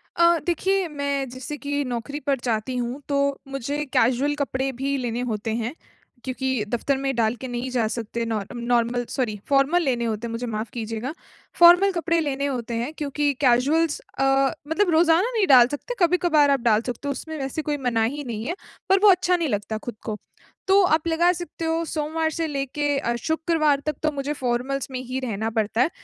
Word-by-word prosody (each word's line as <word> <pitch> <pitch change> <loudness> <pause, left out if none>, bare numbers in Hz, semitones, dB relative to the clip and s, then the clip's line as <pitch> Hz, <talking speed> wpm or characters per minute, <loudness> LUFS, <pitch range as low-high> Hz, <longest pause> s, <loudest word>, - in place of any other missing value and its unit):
अ, 340 0 +5
देखिए, 375 +2 +1
मैं 280 -2 -2
जैसे 260 +4 -7
कि 285 0 -2
नौकरी 255 +4 -4
पर 275 -3 +2
जाती 230 +1 -1
हूँ 245 +3 -3
तो 280 - +1 0.3
मुझे 275 +2 -3
कैज़ुअल 260 +5 +2
कपड़े 270 -2 -1
भी 270 +3 -2
लेने 245 -2 -2
होते 220 +1 -2
हैं 235 +2 -3 0.5
क्योंकि 260 -2 -1
दफ़्तर 250 +4 0
में 270 -1 -2
डाल 225 0 +1
के 260 - -4
नहीं 245 +1 -4
जा 235 -4 +1
सकते 230 +1 -3
नॉ 225 -2 -1
नॉर्मल 240 0 0
सॉरी 230 -6 -2
फ़ॉर्मल 280 +6 +3
लेने 240 -4 0
होते 225 +1 -2
हैं - - -6
मुझे 235 +2 -4
माफ 215 0 -3
कीजिएगा। 225 +4 -4 0.5
फ़ॉर्मल 355 +3 +8
कपड़े 335 -2 0
लेने 280 -3 -1
होते 245 -4 -3
हैं 240 +7 -3
क्योंकि 290 -1 -1
कैज़ुअल्स 285 +5 +3 0.2
अ, - - +3 0.4
मतलब 355 +4 +1
रोज़ाना 335 +7 +4
नहीं 400 - +3
डाल 250 -4 +8
सकते। 290 - -5
कभी-कभार 335 -4 +4
आप 275 - +3
डाल 225 -2 +3
सकते 245 +3 -5
हो, 280 - 0
उसमें 315 +3 -6
वैसे 270 +3 -3
कोई 295 -1 -2
मनाही 235 +5 0
नहीं 230 -4 -5
है, 345 +6 -2 0.3
पर 385 0 +5
वो 420 - +9
अच्छा 360 -1 +4
नहीं 335 -5 -1
लगता 210 +1 -2
खुद 235 +1 -7
को। 215 -1 -3 0.5
तो 390 +1 +6
आप 315 -1 +2
लगा 340 +2 +3
सकते 340 -1 -6
हो 325 +1 0
सोमवार 315 +1 -1
से 325 +1 -2
लेके 285 0 -1
अ, 235 0 -1
शुक्रवार 315 +1 +1
तक 305 - -1
तो 310 - +2
मुझे 285 +1 -3
फ़ॉर्मल्स 260 +1 -2
में 255 - -3
ही 255 +1 -4
रहना 225 -3 -2
पड़ता 220 +1 0
है। 285 - +3
275 Hz, 195 wpm, -24 LUFS, 240-315 Hz, 0.5 s, वो